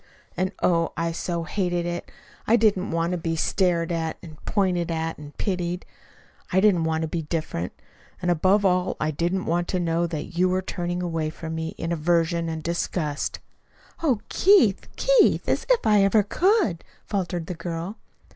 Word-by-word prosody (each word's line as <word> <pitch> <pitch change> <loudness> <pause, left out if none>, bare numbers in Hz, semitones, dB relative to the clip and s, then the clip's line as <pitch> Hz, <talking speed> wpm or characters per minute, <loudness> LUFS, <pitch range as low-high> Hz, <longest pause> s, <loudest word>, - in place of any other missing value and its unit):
And, 185 +1 0
oh, 165 -2 +2
I 165 0 0
so 170 0 -3
hated 175 -1 -1
it! 175 0 -4 0.4
I 225 - +6
didn't 205 -4 +2
want 165 +1 0
to 180 - -1
be 165 0 -1
stared 170 0 +1
at, 165 -1 -2
and 155 -3 -12
pointed 180 -4 +1
out, 160 0 -2
and 150 -1 -11
pitied. 180 -2 -2 0.7
I 190 - +4
didn't 190 -5 +4
want 160 0 0
to - - -1
be 165 +1 -2
different. 155 - -3 0.5
And 175 - +1
above 190 +5 +3
all 180 -1 +2
I 155 - 0
didn't 175 +5 -1
want 175 +1 0
to 185 - -1
know 170 0 +1
that 165 +1 -5
you 185 0 +4
were 185 +1 0
turning 175 -1 -3
away 165 -3 -1
from 160 0 -6
me 160 0 -4
in 165 - -3
aversion 170 0 +1
and 160 -1 -4
disgust." 165 -3 -2 0.6
"Oh, 260 -10 +2
Keith, 365 - +4
Keith, - - +4
as - - 0
if - - +3
I 210 -2 +5
ever 205 +2 +4
could!" 355 - +2 0.2
faltered 175 -4 -2
the 180 - -4
girl. 175 +5 -5
175 Hz, 175 wpm, -25 LUFS, 165-185 Hz, 0.7 s, I